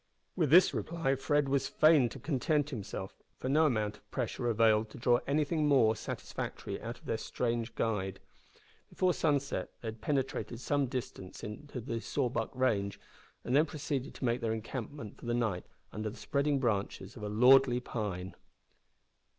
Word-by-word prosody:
With 160 -6 +2
this 175 +5 +7
reply 165 -5 -1
Fred 140 +1 +1
was 135 -1 +1
fain 155 -6 +5
to - - -9
content 145 +1 0
himself, 110 -7 -6 0.2
for 130 - -3
no 155 +3 +5
amount 105 -5 -1
of 105 - -29
pressure 120 0 -2
availed 110 -1 +3
to - - -11
draw 120 +1 +3
anything 150 +2 +1
more 115 -6 +5
satisfactory - - -5
out - - -5
of - - -21
their - - -1
strange 115 -1 -2
guide. 95 -4 -1 0.7
Before 185 -1 +2
sunset 145 -4 0
they 115 - -3
had 110 0 -9
penetrated 135 -4 -1
some 140 +1 +1
distance 120 -7 -6
into 125 +5 -6
the 115 -1 -4
Sawback 130 -1 -1
range, 100 -6 0 0.4
and 125 - 0
then 155 +3 +5
proceeded 145 -2 -3
to - - -4
make 120 +1 +1
their 115 -1 0
encampment 115 +1 -6
for - - -9
the 120 - +1
night 110 -7 -1 0.3
under 110 0 -3
the 110 - -10
spreading 140 0 +1
branches 105 -5 -1
of 115 - -10
a 105 - -3
lordly 125 +3 +6
pine! 95 -7 -4
125 Hz, 165 wpm, -32 LUFS, 110-145 Hz, 0.7 s, this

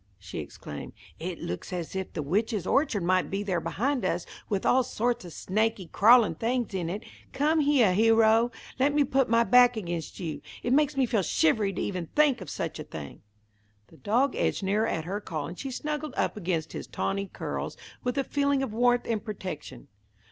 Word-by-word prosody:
she 95 -3 -7
exclaimed. 75 - -8 0.3
"It - - -4
looks 90 - -5
as 180 0 -4
if 190 -1 -3
the 150 - -3
witch's 205 - 0
orchard 270 - +1
might 185 +1 +2
be 195 +1 -2
there 185 -4 -1
behind 245 - -1
us, - - -1 0.2
with 200 -3 -1
all 260 - +5
sorts 240 -3 -1
of 175 - -9
snaky, 215 +2 -1
crawlin' 215 +1 +5
things 235 +5 -1
in 175 -3 -2
it. 200 +5 -4 0.3
Come 305 +3 +2
heah, 280 -9 +4
Hero. 225 +2 +5 0.3
Let 285 +2 +3
me 295 - +5
put 265 -2 +1
my 230 0 +4
back 245 0 +6
against 175 -5 -4
you. 165 -5 -4 0.2
It 245 - +1
makes 295 0 +3
me 265 - +4
feel 225 -4 +1
shivery 195 +4 +2
to - - -3
even 180 -4 -3
think 295 -4 +4
of - - -7
such 165 -4 -4
a - - -4
thing!" 75 - -9 0.7
The 165 - -17
dog 250 - +1
edged - - 0
nearer 210 +4 +1
at 160 -6 -2
her 200 +4 -3
call, 155 -6 -4
and 175 - -8
she 275 - -4
snuggled 300 +3 -4
up - - 0
against 170 -5 -2
his - - -6
tawny 200 0 -2
curls - - -5 0.3
with 250 +2 -1
a 275 - +2
feeling 280 -1 +1
of 230 - -4
warmth 245 +1 +3
and 220 -3 -1
protection. 185 - -7
215 Hz, 200 wpm, -28 LUFS, 180-250 Hz, 0.7 s, back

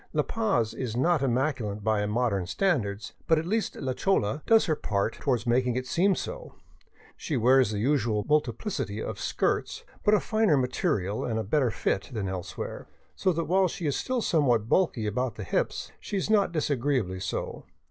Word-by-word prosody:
La - - +2
Paz 195 - 0
is 120 -1 -4
not 165 +3 +2
im 130 -4 +1
maculate 125 -7 -1
by 110 -1 +1
modern 105 -5 0
standards, 110 - -1
but 160 - +4
at 155 - -1
least 215 +4 -1
la 130 -2 -2
chola 150 - 0
does 225 -1 +5
her 155 -3 -1
share 100 +1 +1
toward 125 -1 -1
making 125 0 +2
it 130 0 -2
seem 185 +8 +2
so. - - -6 0.6
She 150 - -3
wears 125 0 +4
the 105 - -3
usual 115 -3 +1
multiplicity 135 - -1
of - - -5
skirts, - - -1 0.2
but 210 - +5
of - - 0
a - - -13
finer 215 -8 +3
material 125 - 0
and 110 -3 -2
better 135 +1 +2
fit 100 -1 -1
than 105 -4 -2
elsewhere, 95 -2 -5 0.3
so 185 - +1
that 165 -1 -1
while 190 +2 +3
she 170 0 -5
is 145 - +1
still 255 -3 -1
somewhat 125 -9 +2
bulky 135 - +2
about 120 +3 -1
the 105 - -6
hips, 90 - -2
she 205 - -4
is 195 +3 -1
not 200 -4 +3
disagreeably 135 - 0
so. 90 -1 -4
130 Hz, 185 wpm, -27 LUFS, 110-170 Hz, 0.6 s, does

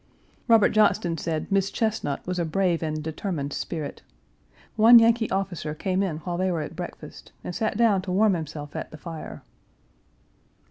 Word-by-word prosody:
Robert 225 -3 +6
Johnston 205 -5 +2
said 160 +3 -3
Miss 195 0 +2
Chesnut 215 -12 -2
was 180 0 -3
a - - +1
brave 170 +1 0
and 155 -1 -3
determined 155 -3 -4
spirit. 155 -4 -5 0.7
One 225 +2 +8
Yankee 230 0 +4
officer 180 -5 -3
came 185 +3 -1
in 180 -6 -1
while 175 +2 -4
they 185 0 +1
were 165 -3 -1
at 150 +2 -7
breakfast 175 0 -9
and 180 - -5
sat 220 +2 -1
down 220 -5 +3
to 185 - -5
warm 205 +2 +3
himself 155 -3 -6
at - - -5
the 155 - -11
fire. 165 0 -8
180 Hz, 170 wpm, -25 LUFS, 160-205 Hz, 0.7 s, One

